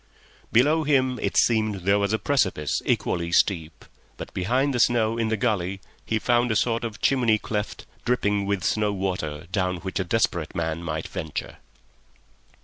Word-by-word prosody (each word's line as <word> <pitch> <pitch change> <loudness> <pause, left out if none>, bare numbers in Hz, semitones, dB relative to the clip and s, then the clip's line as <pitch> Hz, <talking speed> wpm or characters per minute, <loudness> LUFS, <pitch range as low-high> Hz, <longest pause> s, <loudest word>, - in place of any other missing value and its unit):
Below 150 +7 +4
him 130 -4 +2
it - - -1
seemed 110 -4 +2
there 100 +3 +3
was 100 0 0
a 110 - +2
precipice 100 - 0
equally 85 -1 0
steep, 80 -3 +1 0.3
but - - -8
behind 130 +9 +1
the 120 - -1
snow 115 -2 +3
in 115 -1 0
the 110 0 0
gully 100 -4 -1 0.2
he 110 - -1
found 120 +1 +2
a - - +1
sort 115 +1 +1
of 110 -2 -5
chimney 120 -5 +3
cleft 105 0 -4 0.2
dripping 105 -5 0
with 100 -2 -1
snow 105 -1 +1
water, 90 -6 -3
down 90 -2 0
which 95 +2 -4
a - - +1
desperate 90 -4 0
man 85 -1 -2
might 80 -2 -4
venture. 80 -6 -5
105 Hz, 165 wpm, -25 LUFS, 90-115 Hz, 0.3 s, Below